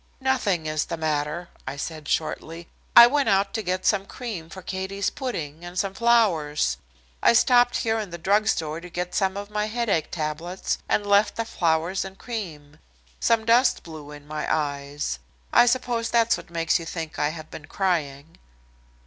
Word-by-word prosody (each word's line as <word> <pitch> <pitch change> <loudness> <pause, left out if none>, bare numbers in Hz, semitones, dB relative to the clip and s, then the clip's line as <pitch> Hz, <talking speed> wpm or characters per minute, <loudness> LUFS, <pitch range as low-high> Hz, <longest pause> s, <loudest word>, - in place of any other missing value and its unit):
"Nothing 235 -11 0
is 155 0 -1
the 170 - -4
matter," 155 +2 -2 0.2
I 135 +2 -4
said 155 0 -6
shortly. 165 +1 -2 0.3
"I 235 - +12
went 280 +3 +2
out 195 0 +2
to 220 - -1
get 185 -1 -2
some 200 -2 +2
cream 205 -10 -6
for 190 +1 -10
Katie's 190 +2 -2
pudding 165 - -5
and 175 +1 -8
some 195 0 0
flowers. 170 - +2 0.4
I - - +5
stopped 245 +1 +5
here 225 0 0
in 210 -3 -4
the 170 - -6
drug 205 +5 +2
store 160 -5 -1
to 180 - -10
get 180 +1 -4
some 190 -1 +1
of 205 +1 -6
my 210 0 -1
headache 220 -7 0
tablets, 165 +3 -3
and 205 - +1
left 205 +1 +3
the 230 - -2
flowers 170 -1 0
and 190 0 -9
cream. 160 -11 -7 0.4
Some 230 -1 +2
dust 240 +3 +4
blew 155 -3 -10
in 145 -1 -11
my 150 0 -4
eyes. 145 - -2 0.3
I 245 - +7
suppose 240 -2 0
that's 230 -1 +3
what - - -10
makes 165 0 +1
you 165 - -7
think 165 -2 -5
I 150 - +2
have 155 0 -9
been 150 - -9
crying." 160 -6 -2
180 Hz, 180 wpm, -25 LUFS, 155-215 Hz, 0.4 s, I